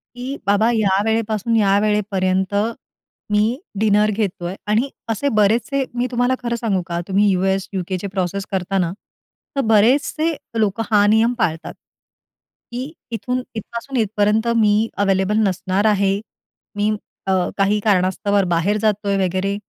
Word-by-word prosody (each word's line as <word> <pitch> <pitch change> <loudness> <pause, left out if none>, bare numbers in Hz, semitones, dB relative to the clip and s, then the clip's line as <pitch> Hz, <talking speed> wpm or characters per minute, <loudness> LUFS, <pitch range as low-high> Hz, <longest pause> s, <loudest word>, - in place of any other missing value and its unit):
की 245 0 -7 0.2
बाबा, 205 +3 +3
या 200 -4 +2
वेळेपासून 225 0 0
या 200 -3 +4
वेळेपर्यंत 195 -2 0 0.8
मी 215 +4 +2 0.2
डिनर 210 0 +3
घेतोय 190 -4 -2
आणि 220 +6 +1 0.2
असे 225 +6 0
बरेचसे 240 +7 +2
मी 245 +1 0
तुम्हाला 245 +1 +1
खरं 235 -1 -1
सांगू 220 -5 -1
का? 170 -1 -2
तुम्ही 200 +1 +2
US, 190 +1 0
UK 185 +1 -3
चे 200 - -3
प्रोसेस 190 0 -2
करता 190 0 -1
ना, 175 -3 +1 0.7
तर - - +3
बरेचसे 285 +9 +3 0.2
लोकं 215 +1 +1
हा 205 -1 +5
नियम 220 +3 +3
पाळतात 160 -5 -1 1.0
की 255 +5 -5 0.2
इथून 250 +2 -2
इथपासून 235 +5 -5
इथपर्यंत 215 0 +1
मी 215 0 +3
अवेलेबल 195 +1 +1
नसणार 190 +2 -1
आहे. 200 -2 +2 0.6
मी 205 +1 +1 0.4
अ, - - +2 0.3
काही 200 +1 +2
कारणास्तव 200 0 +1
बाहेर 175 +5 +1
जातोय 205 -1 0
वगैरे, 190 +2 -1
210 Hz, 135 wpm, -20 LUFS, 195-225 Hz, 1.0 s, हा